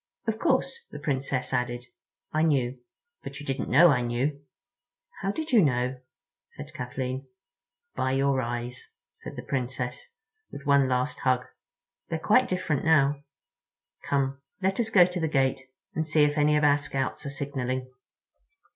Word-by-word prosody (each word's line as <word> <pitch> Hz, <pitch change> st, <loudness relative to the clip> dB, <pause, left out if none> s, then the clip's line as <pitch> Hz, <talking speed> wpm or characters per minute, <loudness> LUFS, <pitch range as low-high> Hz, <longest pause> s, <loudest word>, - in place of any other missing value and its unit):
"Of 220 Hz, -1 st, -1 dB
course," 470 Hz, -, +1 dB
the -, -, -8 dB
Princess 135 Hz, -2 st, -2 dB
added, 125 Hz, 0 st, -1 dB, 0.5 s
"I 155 Hz, -, +2 dB
knew—but 135 Hz, -, -2 dB
you 145 Hz, -, -8 dB
didn't 135 Hz, -1 st, -2 dB
know 170 Hz, +6 st, +7 dB
I 125 Hz, -3 st, +2 dB
knew." 125 Hz, +5 st, -1 dB, 0.8 s
"How 195 Hz, -, 0 dB
did 315 Hz, +7 st, -4 dB
you 235 Hz, -4 st, +7 dB
know?" 125 Hz, -3 st, +1 dB, 0.5 s
said -, -, -11 dB
Kathleen. 130 Hz, +1 st, -4 dB, 0.7 s
"By 130 Hz, -, 0 dB
your 135 Hz, 0 st, +2 dB
eyes," 120 Hz, +1 st, -5 dB, 0.3 s
said -, -, -9 dB
the -, -, -6 dB
Princess, 125 Hz, -1 st, -3 dB, 0.4 s
with 140 Hz, -, -9 dB
one 140 Hz, -2 st, +4 dB
last 125 Hz, 0 st, 0 dB
hug; 125 Hz, -1 st, +1 dB, 0.6 s
"they're 165 Hz, -, -1 dB
quite 215 Hz, +10 st, +4 dB
different 170 Hz, -6 st, -1 dB
now. 145 Hz, -2 st, +3 dB, 0.8 s
Come, 140 Hz, -1 st, 0 dB, 0.2 s
let 195 Hz, +2 st, 0 dB
us 225 Hz, -2 st, +1 dB
go 185 Hz, -5 st, +7 dB
to 180 Hz, 0 st, -3 dB
the 160 Hz, -, +1 dB
gate 135 Hz, -3 st, +1 dB, 0.3 s
and 160 Hz, -, 0 dB
see 155 Hz, -1 st, +3 dB
if 145 Hz, 0 st, +2 dB
any 150 Hz, 0 st, +4 dB
of 150 Hz, -, +1 dB
our 145 Hz, 0 st, +5 dB
Scouts 135 Hz, -2 st, -3 dB
are -, -, -2 dB
signaling." 130 Hz, -2 st, -3 dB
140 Hz, 155 wpm, -27 LUFS, 130-155 Hz, 0.8 s, know